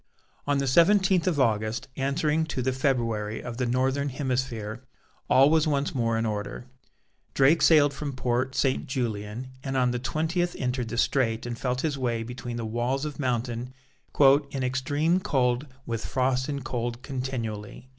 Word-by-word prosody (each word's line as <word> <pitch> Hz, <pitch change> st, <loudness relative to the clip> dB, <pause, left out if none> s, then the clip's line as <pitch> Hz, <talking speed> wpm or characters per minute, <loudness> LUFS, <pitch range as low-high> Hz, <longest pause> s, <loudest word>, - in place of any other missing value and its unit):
On 145 Hz, 0 st, +2 dB
the 140 Hz, -, 0 dB
seventeenth 185 Hz, +5 st, +4 dB
of 165 Hz, -5 st, +1 dB
August, 110 Hz, -3 st, 0 dB
answering 150 Hz, +3 st, 0 dB
to 130 Hz, -5 st, -3 dB
the 130 Hz, +1 st, 0 dB
February 115 Hz, -5 st, 0 dB
of 120 Hz, -1 st, -7 dB
the 125 Hz, -1 st, 0 dB
northern 135 Hz, +3 st, +1 dB
hemisphere, 125 Hz, -5 st, -3 dB, 0.5 s
all 135 Hz, +3 st, +6 dB
was 160 Hz, -1 st, +3 dB
once 145 Hz, -1 st, 0 dB
more 115 Hz, -4 st, 0 dB
in 115 Hz, -, 0 dB
order. 105 Hz, +2 st, -4 dB, 0.7 s
Drake 140 Hz, +5 st, +5 dB
sailed 145 Hz, -3 st, +5 dB
from 140 Hz, 0 st, -4 dB
Port 130 Hz, +1 st, -1 dB
St. 135 Hz, -2 st, +1 dB
Julian, 115 Hz, -1 st, -3 dB
and 135 Hz, -1 st, -2 dB
on 125 Hz, -1 st, +3 dB
the 125 Hz, -, -2 dB
twentieth 160 Hz, +7 st, -1 dB
entered 125 Hz, -1 st, -2 dB
the 115 Hz, -, -4 dB
Strait 115 Hz, -3 st, +1 dB
and 120 Hz, -1 st, -3 dB
felt 125 Hz, +1 st, -2 dB
his 145 Hz, -4 st, -1 dB
way 120 Hz, -3 st, -1 dB
between 120 Hz, 0 st, -6 dB
the 115 Hz, -, -3 dB
walls 120 Hz, +5 st, -1 dB
of 150 Hz, -1 st, -6 dB
mountain 125 Hz, -1 st, -2 dB, 0.4 s
"in 140 Hz, -1 st, +4 dB
extreme 145 Hz, +7 st, +1 dB
cold 130 Hz, -4 st, 0 dB, 0.2 s
with 115 Hz, -1 st, -3 dB
frost 130 Hz, +1 st, 0 dB
and 140 Hz, -2 st, -4 dB
cold 120 Hz, 0 st, -3 dB
continually." 125 Hz, -4 st, -5 dB
130 Hz, 165 wpm, -27 LUFS, 120-140 Hz, 0.7 s, all